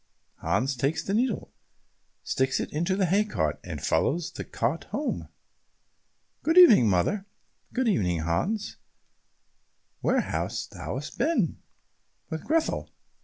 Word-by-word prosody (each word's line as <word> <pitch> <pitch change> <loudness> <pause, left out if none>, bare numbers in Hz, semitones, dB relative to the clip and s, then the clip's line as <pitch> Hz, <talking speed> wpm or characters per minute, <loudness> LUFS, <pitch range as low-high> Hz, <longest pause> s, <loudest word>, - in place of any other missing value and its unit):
Hans 135 +2 0
takes 135 +5 0
the 195 - -2
needle, 235 0 0 0.7
sticks 130 0 0
it - - -4
into 170 +6 0
a 190 - +4
hay 195 +5 +3
cart, 80 - -1
and - - -6
follows 170 +2 0
the - - -6
cart 165 - -2
home. 290 +2 -3 1.1
"Good 325 +3 +1
evening, 220 - +9
mother." 185 - +1 0.4
"Good 255 -1 0
evening, 90 - +1
Hans. 180 - -1 1.2
Where - - +2
hast - - -3
thou - - -5 0.2
been?" 230 - +1 0.7
"With 160 -1 -4
Grethel." 320 +1 0
175 Hz, 120 wpm, -27 LUFS, -, 1.2 s, evening